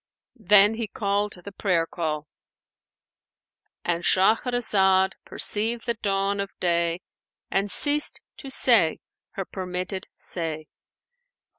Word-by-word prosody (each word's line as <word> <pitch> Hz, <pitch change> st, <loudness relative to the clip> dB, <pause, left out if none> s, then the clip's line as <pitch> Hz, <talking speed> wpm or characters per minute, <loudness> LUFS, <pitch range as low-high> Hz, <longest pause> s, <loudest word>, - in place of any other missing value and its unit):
Then 205 Hz, +1 st, +5 dB
he 225 Hz, -, -2 dB
called 205 Hz, 0 st, -2 dB
the 200 Hz, -, -8 dB
prayer 180 Hz, -4 st, 0 dB
call,—And 165 Hz, +2 st, -9 dB
Shahrazad 190 Hz, -2 st, +2 dB
perceived 225 Hz, +3 st, +1 dB
the 235 Hz, -, 0 dB
dawn 200 Hz, -2 st, -1 dB
of 200 Hz, 0 st, -3 dB
day 170 Hz, 0 st, 0 dB, 0.5 s
and 200 Hz, +1 st, 0 dB
ceased 290 Hz, +6 st, +3 dB, 0.2 s
to 275 Hz, -, -9 dB
say 230 Hz, -11 st, +3 dB, 0.3 s
her 195 Hz, -, -5 dB
permitted 185 Hz, +1 st, -5 dB
say. 160 Hz, -3 st, -1 dB
195 Hz, 100 wpm, -24 LUFS, 175-210 Hz, 0.5 s, Then